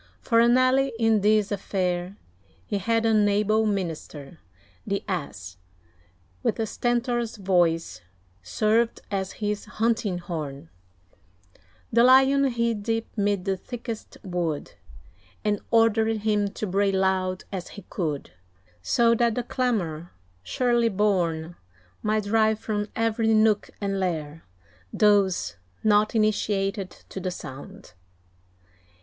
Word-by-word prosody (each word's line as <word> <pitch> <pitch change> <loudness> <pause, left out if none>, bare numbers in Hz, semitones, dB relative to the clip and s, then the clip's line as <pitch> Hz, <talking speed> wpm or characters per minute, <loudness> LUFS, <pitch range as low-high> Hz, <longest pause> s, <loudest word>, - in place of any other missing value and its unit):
For 230 -2 +2
an 240 +2 +5
ally 260 +1 +3
in 225 -2 +3
this 210 0 +3
affair, 185 -1 -2 0.5
He 205 - -2
had 230 +3 +1
an 215 -2 +4
able 215 +2 +2
minister. 165 -6 -4 0.5
The 200 0 -1
Ass, 100 - -5 0.8
with - - 0
Stentor's 240 0 -1
voice, 170 - +1 0.4
served 215 - +1
as 195 -1 -2
his 210 -1 -3
hunting 215 -3 0
horn; 150 - -6 1.2
The 235 +1 +5
Lion 265 +2 +6
hid 235 -4 0
deep 225 +2 -2
'mid 205 -3 0
the 195 -1 +1
thickest 230 +3 -7
wood, 175 -6 -3 0.7
And 210 -1 +1
ordered 225 -1 +3
him 210 -1 +1
to 210 +2 -5
bray 195 +1 +1
loud 190 -1 0
as 185 -3 -5
he 200 - -11
could; 150 - -3 0.5
So 230 - +3
that 235 -1 +2
the 245 - -1
clamour 185 - -2 0.3
shrilly 235 - +1
borne, 175 -5 0 0.4
Might 215 0 0
drive 220 +1 +2
from 210 -1 -3
every 225 0 +1
nook 215 -1 +3
and 195 -1 -2
lair 165 -4 -3 0.5
Those 195 - +2 0.3
not 210 +1 +3
initiated 200 -3 0 0.2
to - - -6
the 185 0 -2
sound. 140 - -10
205 Hz, 120 wpm, -25 LUFS, 180-225 Hz, 1.2 s, Lion